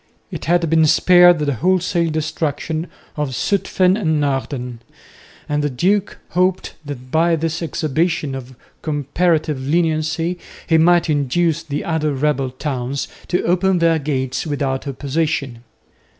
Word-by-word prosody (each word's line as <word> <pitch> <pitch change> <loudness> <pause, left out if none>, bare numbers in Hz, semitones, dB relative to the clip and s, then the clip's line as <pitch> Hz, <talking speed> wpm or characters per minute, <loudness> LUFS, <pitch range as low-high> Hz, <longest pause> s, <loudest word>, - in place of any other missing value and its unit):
It - - -6
had 170 +1 +2
been 160 0 +4
spared 175 +2 +6
the 150 -2 0
wholesale 175 - +1
destruction 155 +1 -2 0.3
of 145 -4 -2
Zutphen 185 0 +1
and 160 -8 0
Naarden, 135 -4 -2 0.7
and 150 0 0
the 145 - +1
duke 190 - 0
hoped 185 +1 0
that 130 -3 -8
by 165 +1 +3
this 165 +1 -2
exhibition 160 -2 -1
of 130 -1 -8 0.3
comparative 155 0 0
leniency 165 +3 0 0.3
he 160 -1 +3
might 175 +1 +4
induce 155 +3 +1
the 145 -3 -4
other 155 -3 0
rebel 135 -1 0
towns 130 0 -3 0.2
to 180 - 0
open 185 +2 +2
their 165 -1 +3
gates 130 -2 -2
without 140 -2 -2
opposition. 140 -2 -2
155 Hz, 130 wpm, -19 LUFS, 140-170 Hz, 0.7 s, spared